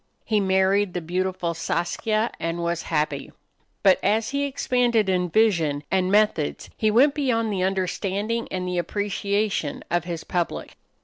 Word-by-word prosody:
He 215 -2 +2
married 190 0 +2
the - - 0
beautiful 180 0 -2
Saskia 215 +7 -1
and 165 +1 -2
was 170 0 -1
happy. 150 -3 -1 0.5
But 190 -1 +5
as 220 +3 +1
he 280 0 0
expanded 245 -5 +1
in 180 -1 +1
vision 165 -9 +2
and 185 -1 +1
methods 205 -8 +1
he 215 - +1
went 260 +7 +5
beyond 230 -7 0
the 190 - -1
understanding 195 +4 -1
and 180 -1 -3
the 180 -1 -1
appreciation 200 -2 -1
of 175 -1 +1
his 170 -2 -4
public. 175 -2 -3
190 Hz, 145 wpm, -24 LUFS, 175-215 Hz, 0.5 s, But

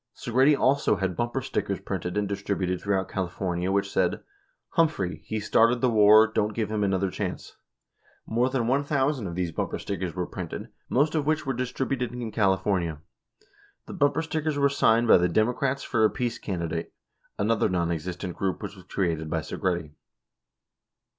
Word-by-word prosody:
Segretti 130 +5 +3
also 140 +2 +3
had 95 -2 -2
bumper 120 +6 -2
stickers - - -2
printed 90 +3 -4
and 105 -1 +1
distributed 95 -2 -2
through 100 -1 +1
out 95 - -2
California 90 0 -2
which 100 0 0
said: - - 0 0.5
"Humphrey: 100 - 0
He 110 +6 -2
started 115 +3 +3
the 125 0 +2
Avar, 110 0 +7
don't 110 -1 -1
give 110 -2 -2
him 105 -1 0
another 95 -1 +1
chance." - - -5 0.7
More 120 +3 +1
than 130 -3 0
1,000 135 -2 +1
of 85 - -5
these 90 -2 -1
bumper - - -3
stickers 90 -3 -4
were 90 -1 -1
printed, 85 -3 -6 0.2
most 145 +4 +2
of 150 -3 0
which 155 -1 +1
were 135 - -1
distributed 125 0 -2
in 120 -2 -5
California. 95 -6 +1 0.9
The - - -8
bumper 145 -2 +2
stickers 155 -2 -2
were 140 0 +4
signed 120 -4 +3
by 110 - +7
the 90 0 +2
"Democrats 125 +7 +1
for 110 -3 +1
a 110 - +6
Peace 120 -1 -3
Candi 85 -4 -3
date," 85 0 -4 0.4
another 110 +2 +1
nonexistent 90 +1 -2
group 95 -2 -2
which - - -6
was 90 -2 -15
created 85 -5 -1
by 80 0 -1
Segretti. 85 -3 -2
105 Hz, 170 wpm, -26 LUFS, 90-125 Hz, 0.9 s, Avar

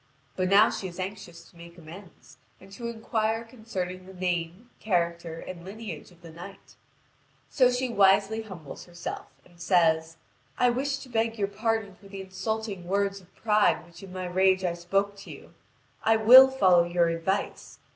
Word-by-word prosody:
But 185 0 -1
now 205 +3 +6
she 190 - -4
is 175 0 -10
anxious 185 -3 -7
to - - -27
make 170 +1 -13
amends, 170 +3 -14 0.2
and 190 +1 -16
to 235 +4 -6
inquire 225 -1 -2
concerning 190 -6 -6
the 190 - -12
name, 180 +5 -3
character, 170 -4 -1
and 175 -1 -9
lineage 195 -4 -8
of 175 -1 -22
the 165 - -11
knight: 180 +4 -12 0.8
so 255 -3 +4
she 250 +1 -1
wisely 205 0 +3
humbles 180 -10 -10
herself, 175 -1 -7 0.2
and 175 -1 -19
says: 165 -3 +2 0.4
"I 245 0 +3
wish 275 +3 -1
to 270 - -12
beg 225 -1 -1
your 200 -2 0
pardon 220 -1 -2
for 200 +2 -18
the 195 0 -8
insulting 195 -1 -4
words 200 +1 -1
of 180 0 -24
pride 210 -5 +2
which 170 -1 -15
in 195 -2 -11
my 185 0 -5
rage 190 +1 +2
I 175 -2 0
spoke 195 +4 -1
to 200 - -12
you: - - -12 0.5
I 225 - +4
will 245 +5 +9
follow 185 -10 +4
your 175 0 +1
advice. 165 +4 -3
190 Hz, 175 wpm, -27 LUFS, 175-220 Hz, 0.8 s, will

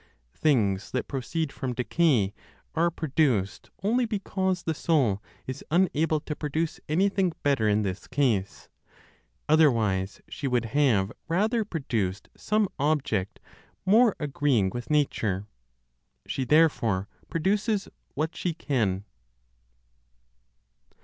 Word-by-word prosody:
Things 110 -10 +1
that 130 - -1
proceed 140 +3 -2
from 130 -4 -4
decay 125 - +2 0.4
are 170 +2 +2
produced 140 - 0
only 240 +5 +2
because 190 -4 -1
the 160 - -1
Soul 135 - +1 0.2
is 130 - -6
unable 160 -2 +2
to 150 - -5
produce 155 +2 -2
anything 190 +2 +2
better 135 -7 +2
in 105 +1 +2
this 95 -1 -4
case; 125 -8 0 0.8
otherwise 115 -11 +3
she 140 - -4
would 125 -3 +1
have 115 -6 +2 0.2
rather 215 +7 +1
produced 115 - -3
some 210 0 +1
object 135 -10 0 0.5
more 220 +3 +5
agreeing 140 -9 +1
with 120 +1 -6
nature; 110 -10 +1 0.8
she 130 - -2
therefore 120 -10 +3 0.2
produces 200 +5 0 0.3
what 155 +3 -2
she 175 -3 -2
can. 105 - -1
145 Hz, 110 wpm, -27 LUFS, 110-165 Hz, 0.8 s, more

